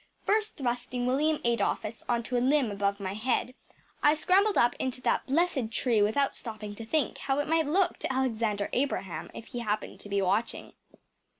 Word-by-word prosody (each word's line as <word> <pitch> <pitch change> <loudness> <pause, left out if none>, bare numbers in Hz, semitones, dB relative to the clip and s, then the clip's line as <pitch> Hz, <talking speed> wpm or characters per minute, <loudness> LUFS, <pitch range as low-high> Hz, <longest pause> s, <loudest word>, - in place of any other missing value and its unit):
First 430 0 +1
thrusting 245 -2 -2
William 295 +5 +2
Adolphus 230 -1 0
on 235 -1 +1
to 250 - -4
a 240 - +2
limb 265 -3 +3
above 200 0 -1
my 190 -1 -3
head, 245 +3 -1 0.5
I 295 +1 +5
scrambled 390 +6 +3
up 240 0 +4
into 260 -1 -2
that - - 0
blessed 275 -5 +1
tree 230 -2 +2
without 220 +7 +2
stopping 215 -3 -7
to 225 +2 -8
think 310 +3 0
how 270 0 -1
it 290 - 0
might 320 -1 +2
look 365 +5 +2
to - - -2
Alexander 225 -6 0
Abraham 245 -9 -1
if 225 - -8
he 245 - -5
happened 215 -2 -3
to 205 - -11
be 200 0 +1
watching. 200 +4 -1
245 Hz, 185 wpm, -29 LUFS, 215-285 Hz, 0.5 s, I